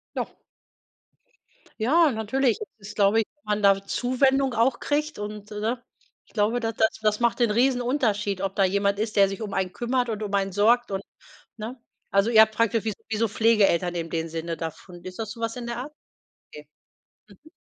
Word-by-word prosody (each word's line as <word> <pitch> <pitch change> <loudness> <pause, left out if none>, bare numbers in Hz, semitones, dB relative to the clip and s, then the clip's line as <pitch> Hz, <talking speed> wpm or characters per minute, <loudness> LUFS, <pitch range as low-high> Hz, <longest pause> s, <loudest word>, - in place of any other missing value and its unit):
Doch. - - -4 1.5
Ja, 305 +7 +4
natürlich, 230 +2 0 0.2
das 210 +1 -10
glaube 205 +2 +4
ich, 220 - -2
dass 295 - -44
man 210 0 -1
da 195 0 +4
Zuwendung 265 +2 +1
auch 235 +3 +2
kriegt. 300 -2 -1
Und, 210 0 -7
äh, 210 0 -5
ne? 235 +3 -2 0.4
Ich - - -27
glaube, 220 +3 +1
da 225 -1 -1
das 220 0 +3
das 215 +1 +1
macht 235 +1 +1
den 235 -3 +3
Riesenunterschied, 240 -5 +1
ob 195 0 -2
da 195 - +4
jemand 200 +1 +1
ist, 215 0 -2
der 195 -1 +6
sich 195 +2 -6
um 205 -2 -5
einen 185 -1 -1
kümmert 245 0 -1
und 215 -1 -3
um 205 -1 -4
einen 195 -1 0
sorgt 225 +4 +3
und 195 0 -2 0.6
ne? 235 +4 -7 0.3
Also, 200 +3 +3
ihr 220 -2 +7
habt 220 0 +3
praktisch 230 -1 +1
wie 215 - -1 0.2
wie 215 - -1
so 230 0 +2
Pflegeeltern 200 -5 +3
in 165 -1 -3
dem 165 -1 -2
Sinne 165 +1 -4
davon. 170 +2 -8
Ist 185 +3 -9
das 220 -1 -4
so 230 - -10
was 230 +1 -2
in 240 -1 -6
der 235 0 -4
Art? 285 +5 -6 0.6
Okay. 150 -1 -12 0.8
Mhm. 315 - -17
215 Hz, 200 wpm, -25 LUFS, 200-240 Hz, 1.5 s, ihr